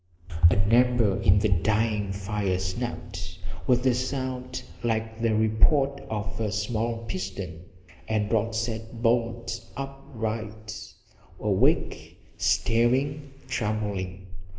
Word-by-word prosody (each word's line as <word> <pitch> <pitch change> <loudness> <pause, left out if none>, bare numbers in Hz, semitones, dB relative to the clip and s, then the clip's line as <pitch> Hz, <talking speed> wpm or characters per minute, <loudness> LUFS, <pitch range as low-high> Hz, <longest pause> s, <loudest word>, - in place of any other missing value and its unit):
An 100 +3 +2
ember 120 -5 +4
in 95 0 +6
the 105 +2 +3
dying 105 +2 +1
fire 100 -1 -1
snapped 95 -3 -4 0.3
with 125 0 +3
a 130 - +5
sound 130 0 -3 0.2
like 110 -1 -1
the 115 -2 +2
report 110 +6 +3
of 110 0 -3
a 110 -2 0
small 115 +2 -1
pistol 95 -2 -4 0.6
and 110 -1 0
Rod 115 0 +1
sat 115 0 -3
bolt 115 0 +1
upright, 110 -5 -5 0.4
awake, - - +1 0.2
staring, 135 +5 +2 0.2
trembling. 105 -6 -2
110 Hz, 105 wpm, -27 LUFS, 105-120 Hz, 0.6 s, in